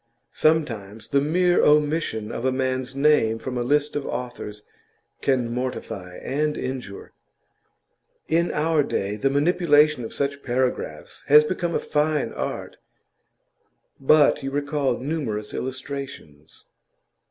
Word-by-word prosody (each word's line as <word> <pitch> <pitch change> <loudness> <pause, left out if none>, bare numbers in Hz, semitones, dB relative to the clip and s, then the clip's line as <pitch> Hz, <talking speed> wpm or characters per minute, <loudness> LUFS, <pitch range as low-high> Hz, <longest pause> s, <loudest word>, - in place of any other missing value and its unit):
Sometimes 115 -10 0
the 140 -1 +3
mere 175 +4 +3
omission 150 -7 +2
of 115 - -5
a 130 - +2
man's 130 0 -2
name 140 -6 +3
from 125 +2 -5
a 120 - -1
list 145 +4 +1
of 145 - -1
authors 120 -5 -6 0.6
can 125 -4 +1
mortify 110 -7 -5
and 150 +2 -1
injure. 125 -6 -6 1.1
In 170 +2 +2
our 155 0 +2
day 100 -7 -2
the 120 +6 +1
manipulation 150 -2 +3
of 110 - -6
such 140 0 -2
paragraphs 130 0 -2
has 150 +1 +8
become 170 +1 -2
a - - +2
fine 150 -1 0
art; - - -5 1.2
but 150 +2 +4
you 135 - -3
recall 145 -2 -1
numerous 125 -7 -3
illustrations. 130 - -7
135 Hz, 120 wpm, -24 LUFS, 120-150 Hz, 1.2 s, has